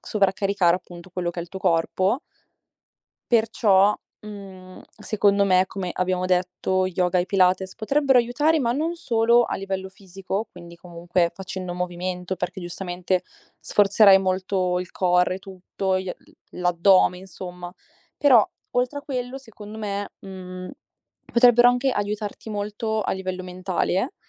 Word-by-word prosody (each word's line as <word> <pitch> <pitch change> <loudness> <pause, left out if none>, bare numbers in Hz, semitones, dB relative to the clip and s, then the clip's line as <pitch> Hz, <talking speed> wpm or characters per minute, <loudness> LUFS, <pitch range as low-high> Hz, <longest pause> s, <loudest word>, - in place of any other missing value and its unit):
sovraccaricare 195 -3 +1
appunto, 175 0 -12
quello 180 -1 -2
che 175 - -6
è - - -3
il 170 - -11
tuo 190 - -7
corpo 185 - +1 1.1
perciò, 210 -3 +4 0.3
mhmm, 195 -3 -11 0.2
secondo 200 -1 +2
me, 185 -1 +3
come 190 -2 -5
abbiamo 185 0 -1
detto, 185 +1 0
yoga 180 0 0
e 175 - 0
pilates 190 -1 +2
potrebbero 270 +4 +2
aiutare, 290 +7 +2
ma 235 -5 +1
non 315 +6 -1
solo 235 -7 +3
a - - -3
livello 190 -1 -4
fisico. 195 +2 -5
Quindi 170 -1 -12
comunque 170 0 -1
facendo 185 -2 -6
movimento, 180 +1 -4
perché 180 +1 -4
giustamente 180 +1 -2 0.4
sforzerai 200 -1 +5
molto 185 -1 0
il 180 - -7
core 180 0 +2
e - - -6
tutto, 190 0 -3
gli 185 -1 -4 0.4
l'addome 180 +1 +3
insomma. 180 -1 -9 0.5
Però 255 -7 +5 0.2
oltre 250 +3 -1
a - - -9
quello, 255 -2 -4
secondo 220 -5 -11
me, 205 -2 -4
mhmm, 185 -1 -8 0.6
potrebbero 240 0 +6
anche 250 +2 +2
aiutarti 205 -1 -4
molto 215 +1 -2
a - - -1
livello 185 -1 -4
mentale, 185 - -2
190 Hz, 135 wpm, -23 LUFS, 180-215 Hz, 1.1 s, potrebbero